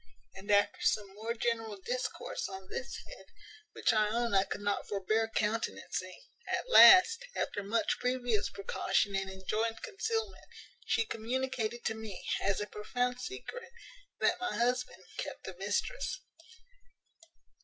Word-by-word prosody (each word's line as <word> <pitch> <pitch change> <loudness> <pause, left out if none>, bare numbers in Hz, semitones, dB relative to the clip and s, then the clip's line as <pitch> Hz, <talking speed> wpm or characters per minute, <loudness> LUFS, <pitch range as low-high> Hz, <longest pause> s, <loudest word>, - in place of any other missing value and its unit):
And 195 +2 -11
after 205 0 +3
some 205 -2 +1
more 225 +3 -4
general 225 -3 -1
discourse 245 +3 -3
on 190 -1 -8
this 265 - -4
head, - - -12 0.5
which - - +2
I 215 -1 +3
own 235 0 0
I 195 0 +4
could 205 - -5
not 205 0 -1
forbear 215 +3 +1
countenancing, 225 +1 -2 0.3
at - - -1
last, 455 +3 +9
after 205 - -1
much 210 +2 0
previous 245 -4 0
precaution 200 0 0
and 195 0 -1
enjoined 215 +4 -2
concealment, 445 0 -3 0.4
she 450 - +2
communicated 240 - -2
to - - +1
me, 220 -4 -8 0.2
as 195 -1 +1
a 210 - -1
profound 245 +4 -2
secret 395 - -7 0.5
that - - +2
my 365 0 -2
husband 245 -6 0
kept - - -5
a 190 - -5
mistress. 210 - -1
225 Hz, 135 wpm, -32 LUFS, 205-250 Hz, 0.5 s, last